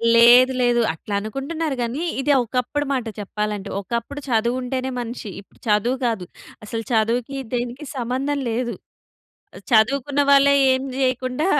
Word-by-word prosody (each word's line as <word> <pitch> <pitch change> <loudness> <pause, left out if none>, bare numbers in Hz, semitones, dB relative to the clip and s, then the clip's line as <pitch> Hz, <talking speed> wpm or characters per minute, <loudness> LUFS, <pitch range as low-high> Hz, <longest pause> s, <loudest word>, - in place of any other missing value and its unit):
లేదు. 245 +2 +7
లేదు. 240 -1 +3
అట్లానుకుంటున్నారు 270 - -3
గానీ, 245 +8 -2 0.2
ఇది 290 - +1
ఒకప్పుడు 250 +5 -2
మాట 250 -3 -1
చెప్పాలంటే. 210 0 -3
ఒకప్పుడు 235 +7 -4
చదువుంటేనే 250 +3 0
మనిషి. 235 -2 -6
ఇప్పుడు - - -26
చదువు 215 +5 +2
కాదు 220 -6 -1 0.4
అసలు 225 +1 -4
చదువుకి 235 +4 0 0.2
దీనికి 245 +4 -3
సంబంధం 260 +4 -1
లేదు. 235 +1 -2 1.0
చదువుకున్న 270 +5 +3
వాళ్ళే 280 0 +6 0.2
ఏం 260 - 0 0.2
చేయకుండా 255 +3 0
245 Hz, 120 wpm, -22 LUFS, 225-270 Hz, 1.0 s, లేదు